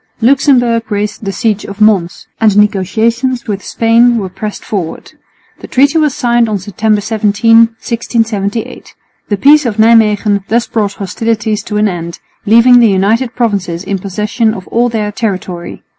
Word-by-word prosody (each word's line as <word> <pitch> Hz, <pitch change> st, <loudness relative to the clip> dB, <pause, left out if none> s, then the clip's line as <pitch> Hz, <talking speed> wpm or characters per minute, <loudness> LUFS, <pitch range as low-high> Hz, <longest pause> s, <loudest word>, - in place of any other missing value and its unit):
Luxemburg 245 Hz, -3 st, +2 dB
raised 210 Hz, +1 st, -3 dB
the 195 Hz, -, -2 dB
siege 210 Hz, 0 st, -1 dB
of 200 Hz, +1 st, -9 dB
Mons, 195 Hz, -5 st, +1 dB
and 220 Hz, -, +4 dB
the 205 Hz, 0 st, +4 dB
negotiations 230 Hz, +5 st, -1 dB
with 200 Hz, -2 st, -4 dB
Spain 235 Hz, +1 st, +2 dB
were 195 Hz, -4 st, -3 dB
pressed 200 Hz, +3 st, -7 dB
forward. 185 Hz, -6 st, -5 dB, 0.5 s
The -, -, -10 dB
treaty 280 Hz, +5 st, +2 dB
was 300 Hz, -4 st, 0 dB
signed 240 Hz, -2 st, +1 dB
on 210 Hz, -, -1 dB
September 210 Hz, +2 st, -1 dB
17, 220 Hz, +1 st, +1 dB
1678. 225 Hz, -2 st, -1 dB, 0.3 s
The 205 Hz, -, 0 dB
peace 295 Hz, +7 st, +5 dB
of 230 Hz, -4 st, -3 dB
Nijmwegen 215 Hz, -3 st, +3 dB
thus 235 Hz, +1 st, +1 dB
brought 205 Hz, -3 st, -2 dB
hostilities 215 Hz, +2 st, -2 dB
to 210 Hz, -, -3 dB
an 210 Hz, 0 st, +2 dB
end, 170 Hz, -3 st, -5 dB, 0.3 s
leaving 235 Hz, +3 st, +6 dB
the 230 Hz, -2 st, +4 dB
United 225 Hz, +6 st, 0 dB
Provinces 195 Hz, -7 st, -2 dB
in 195 Hz, 0 st, -3 dB
possession 210 Hz, +4 st, -2 dB
of 185 Hz, -, -9 dB
all 240 Hz, +1 st, +1 dB
their 215 Hz, -3 st, -3 dB
territory. 185 Hz, -5 st, -5 dB
220 Hz, 160 wpm, -12 LUFS, 200-235 Hz, 0.5 s, leaving